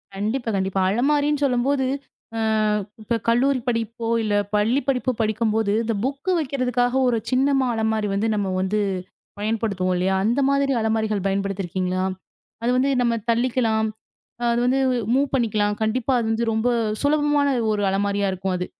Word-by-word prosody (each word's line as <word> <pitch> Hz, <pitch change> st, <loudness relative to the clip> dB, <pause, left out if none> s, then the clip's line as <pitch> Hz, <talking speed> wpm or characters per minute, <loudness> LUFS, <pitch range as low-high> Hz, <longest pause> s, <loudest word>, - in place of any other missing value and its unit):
கண்டிப்பா, 225 Hz, +5 st, -2 dB
கண்டிப்பா. 190 Hz, 0 st, 0 dB
அலமாரின்னு 290 Hz, +5 st, +1 dB
சொல்லும்போது 265 Hz, +1 st, +1 dB, 0.5 s
அ -, -, -1 dB, 0.6 s
இப்ப 235 Hz, +2 st, -1 dB
கல்லூரி 255 Hz, +3 st, +3 dB
படிப்போ, 230 Hz, -1 st, -2 dB, 0.2 s
இல்ல 215 Hz, -1 st, -1 dB, 0.2 s
பள்ளிப்படிப்போ 255 Hz, +4 st, +1 dB
படிக்கும்போது 220 Hz, -1 st, 0 dB
இந்த 230 Hz, 0 st, -1 dB
புக் 275 Hz, +7 st, -3 dB
வைக்கறதுக்காக 250 Hz, -4 st, 0 dB
ஒரு 240 Hz, -2 st, +2 dB
சின்னமா 270 Hz, 0 st, +2 dB
அலமாரி 220 Hz, -1 st, 0 dB
வந்து 200 Hz, +3 st, 0 dB
நம்ம 205 Hz, -2 st, -1 dB
வந்து 195 Hz, +3 st, 0 dB, 0.6 s
பயன்படுத்துவோம் 205 Hz, -4 st, -1 dB
இல்லயா! 185 Hz, +2 st, +1 dB
அந்த 240 Hz, +6 st, +2 dB
மாதிரி 280 Hz, 0 st, +2 dB
அலமாரிகள் 220 Hz, -3 st, 0 dB
பயன்படுத்தி 195 Hz, 0 st, -1 dB
இருக்கீங்களா? 185 Hz, +1 st, -2 dB, 0.6 s
அது 240 Hz, -, +2 dB
வந்து 265 Hz, +2 st, +2 dB
நம்ம 235 Hz, -1 st, +2 dB, 0.2 s
தள்ளிக்கலாம். 230 Hz, -2 st, +1 dB, 0.7 s
அது 235 Hz, -, +1 dB
வந்து 255 Hz, +2 st, +2 dB, 0.4 s
மூவ் 275 Hz, +2 st, +2 dB
பண்ணிக்கலாம். 215 Hz, -4 st, +1 dB
கண்டிப்பா 230 Hz, +4 st, 0 dB
அது 230 Hz, -, -1 dB
வந்து 225 Hz, +1 st, 0 dB
ரொம்ப 220 Hz, +2 st, +1 dB, 0.3 s
சுலபமான 290 Hz, 0 st, +2 dB, 0.2 s
ஒரு 205 Hz, -1 st, -1 dB
அலமாரியா 200 Hz, +1 st, 0 dB
இருக்கும் 185 Hz, 0 st, -2 dB
அது. 180 Hz, 0 st, -3 dB
230 Hz, 140 wpm, -23 LUFS, 205-255 Hz, 0.7 s, கல்லூரி